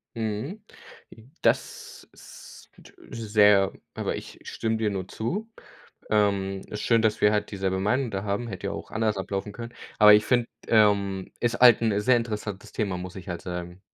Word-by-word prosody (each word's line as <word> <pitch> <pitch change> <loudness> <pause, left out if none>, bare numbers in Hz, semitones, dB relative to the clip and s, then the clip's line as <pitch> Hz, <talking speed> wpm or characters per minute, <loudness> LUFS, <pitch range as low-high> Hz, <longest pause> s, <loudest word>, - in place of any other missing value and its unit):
Mhm. 115 - -4 0.8
Das - - -1
ist - - -14 0.4
sehr 105 -3 +4 0.2
aber - - -2
ich - - -9
stimme 110 0 -2
dir 110 -1 0
nur 95 -2 -4
zu. 200 - -4 0.6
Ähm, 100 -2 +1
ist 105 - -6
schön, 115 -1 +3
dass 110 -1 +1
wir 105 - +5
halt 105 - 0
dieselbe 95 -1 -1
Meinung 120 +5 0
da 95 0 -3
haben, 105 +4 -2
hätte 100 -1 -5
ja 100 - -3
auch - - -8
anders 110 -2 0
ablaufen 100 +1 -4
können. 115 +2 -8 0.3
Aber, 105 0 +9
ich 105 0 +5
finde, 120 -2 +2 0.2
ähm 100 -3 +2
ist 120 -1 -1
halt 120 -2 +7
'n 105 -3 +1
sehr 125 +3 +4
interessantes 105 -4 -5
Thema, 100 -4 -2
muss 90 0 -7
ich 95 0 -10
halt 85 -1 -5
sagen. 90 0 -6
105 Hz, 170 wpm, -26 LUFS, 95-115 Hz, 0.8 s, Aber